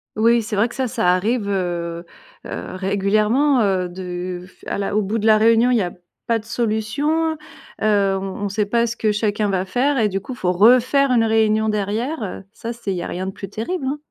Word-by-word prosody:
Oui, 230 +1 +3
c'est 210 0 -4
vrai 220 +4 +2
que - - -11
ça, 260 -1 -1
ça 180 -5 +1
arrive, 210 +2 -1
heu 170 -3 -2 0.4
heu, - - -6
régulièrement, 210 +8 +2
heu, 185 -3 +1
de 180 0 -5
f - - -24
à - - -2
la 200 0 -2
au 215 - +3
bout 210 +3 -2
de 215 - -2
la 215 -1 +6
réunion, 230 +2 +4
il 245 - +3
y 215 - +2
a 175 - -2 0.4
pas 230 -1 +2
de 215 - -10
solution, 250 +9 0 0.5
heu, 200 -2 +2
on 195 +1 -5
on - - 0
sait 205 +1 -1
pas 235 +2 +2
ce 235 - -3
que 215 -3 +1
chacun 210 0 0
va 190 -1 0
faire 260 +8 +1
et 215 -2 +2
du 195 - -2
coup, 255 - -7
il - - -8
faut 180 - 0
refaire 250 +8 +4
une 235 -2 +3
réunion 220 -1 +2
derrière, 215 +7 -2
heu, 195 -2 -5
ça 235 0 -6
c'est 220 -4 -5
il 185 - -2
y - - -3
a - - -4
rien 185 +2 -4
de 190 - -3
plus 195 0 -8
terrible, 265 - -3
hein. 285 +2 -1
215 Hz, 240 wpm, -21 LUFS, 195-235 Hz, 0.5 s, la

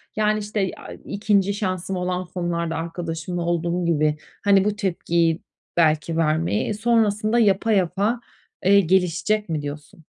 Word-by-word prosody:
yani, 215 0 +2
işte, 205 -2 -2
aaa, - - -10
2'nci 200 -1 +1
şansım 190 -2 -2
olan 180 0 -2
konularda, 175 -2 -2
arkadaşımla 165 +1 -4
olduğum 170 +1 -1
gibi, 155 -2 +2 0.3
hani, 195 -1 +4
bu 210 0 0
tepkiyi 170 -4 0 0.4
belki 160 0 +2
vermeyi, 165 +6 +1
e, - - 0
sonrasında 215 0 +2
yapa 215 0 +3
yapa, 200 +5 +1 0.4
eee, 200 +2 +6
gelişecek 190 +3 +1
mi 155 -2 -1
diyorsun? 145 +2 -8
180 Hz, 135 wpm, -23 LUFS, 165-205 Hz, 0.4 s, eee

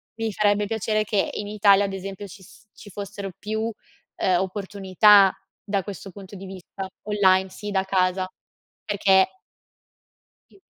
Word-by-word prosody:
mi 225 -1 -2
farebbe 205 0 +2
piacere 215 0 -1
che 205 -2 0
in 205 - -4
Italia, 205 -1 +4
ad 195 - -4
esempio, 195 +1 -6
ci 190 0 -13
s 200 - -18
ci 210 - -13
fossero 200 0 -6
più, 215 +1 -3
uhm, 205 -4 -3
opportunità 195 +1 +4 0.3
da 200 -1 -1
questo 195 0 -8
punto 195 +1 -11
di 195 0 -9
vista, 190 +1 -8 0.2
online, 190 -2 +3
sì 210 +2 -7
da 190 -1 +1
casa, 185 -1 +1 0.6
perché 195 - +2 1.1
Sì. - - -22
200 Hz, 145 wpm, -24 LUFS, 190-210 Hz, 1.1 s, Italia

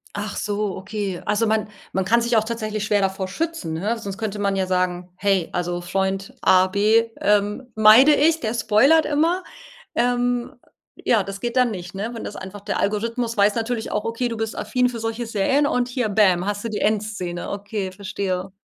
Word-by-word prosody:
Ach 205 0 -4
so, 205 -1 -2
okay. 195 -2 -4
Also, 210 +2 +1
man 215 -1 0 0.2
man 190 -1 0
kann 235 +4 +3
sich 235 0 +1
auch 220 - +3
tatsächlich 215 -2 -3
schwer 210 -1 +2
davor 190 0 -1
schützen, 315 - -3
ne, 210 +8 -1
sonst 200 -3 -6
könnte 210 -2 -3
man 200 -1 0
ja 190 - 0
sagen: 180 -1 -1
„Hey 195 -3 +1
also, 175 0 -2
Freund, 190 +2 -2
A, 185 0 +5
B, 215 +4 +3 0.2
ähm, 210 +5 +1
meide 220 +7 +7
ich, 320 +3 +3
der 220 0 -2
spoilert 235 +9 +4
immer.“ 325 +5 +1 0.5
Ähm, 245 0 0 0.5
ja, 225 -4 +3
das 195 +1 -7
geht 240 +1 -3
dann 250 -2 +4
nicht, 180 -3 -7
ne, 205 +4 -3
wenn 230 - -6
das - - -6
einfach 190 +2 -8
der - - -2
Algorithmus 230 +3 -1
weiß 205 0 +4
natürlich 230 0 -2
auch: 210 - -1
Okay 230 +2 -1
du 230 - -4
bist 225 0 -3
affin 250 -1 +1
für 240 -2 -6
solche 225 +1 -3
Serien 230 +7 +1
und 250 -3 0
hier, 245 -3 -1
Bäm, 190 -3 +3
hast 205 +1 -3
du - - -1
die 210 - -3
Endszene, 205 -5 -2
okay, 200 -1 -4
verstehe. 190 -1 -3
210 Hz, 195 wpm, -22 LUFS, 195-235 Hz, 0.5 s, meide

